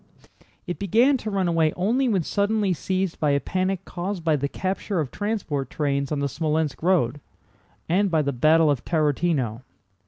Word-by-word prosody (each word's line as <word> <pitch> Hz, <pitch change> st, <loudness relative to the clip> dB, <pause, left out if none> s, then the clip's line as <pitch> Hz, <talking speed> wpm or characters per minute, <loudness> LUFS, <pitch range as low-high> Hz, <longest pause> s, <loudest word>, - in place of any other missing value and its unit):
It 175 Hz, -2 st, -5 dB
began 230 Hz, +8 st, +3 dB
to 220 Hz, -, -5 dB
run 195 Hz, -3 st, 0 dB
away 165 Hz, -2 st, +2 dB
only 240 Hz, +8 st, +1 dB
when 195 Hz, -6 st, +1 dB
suddenly 205 Hz, +1 st, +1 dB
seized 185 Hz, +3 st, -2 dB
by 150 Hz, -, +2 dB
a 140 Hz, 0 st, +3 dB
panic 185 Hz, +3 st, -2 dB
caused 180 Hz, 0 st, -4 dB
by 160 Hz, -2 st, +3 dB
the 140 Hz, 0 st, -1 dB
capture 190 Hz, +2 st, -2 dB
of 145 Hz, -5 st, -2 dB
transport 185 Hz, -, -3 dB
trains 140 Hz, -2 st, -1 dB
on 150 Hz, -, 0 dB
the -, -, 0 dB
Smolénsk 155 Hz, 0 st, -1 dB
road, 155 Hz, -7 st, +1 dB, 0.7 s
and 195 Hz, +4 st, +2 dB
by 160 Hz, -3 st, +2 dB
the 140 Hz, 0 st, -1 dB
battle 155 Hz, +4 st, +4 dB
of 135 Hz, -4 st, -2 dB
Tarútino. 150 Hz, -7 st, 0 dB
165 Hz, 175 wpm, -24 LUFS, 145-195 Hz, 0.7 s, battle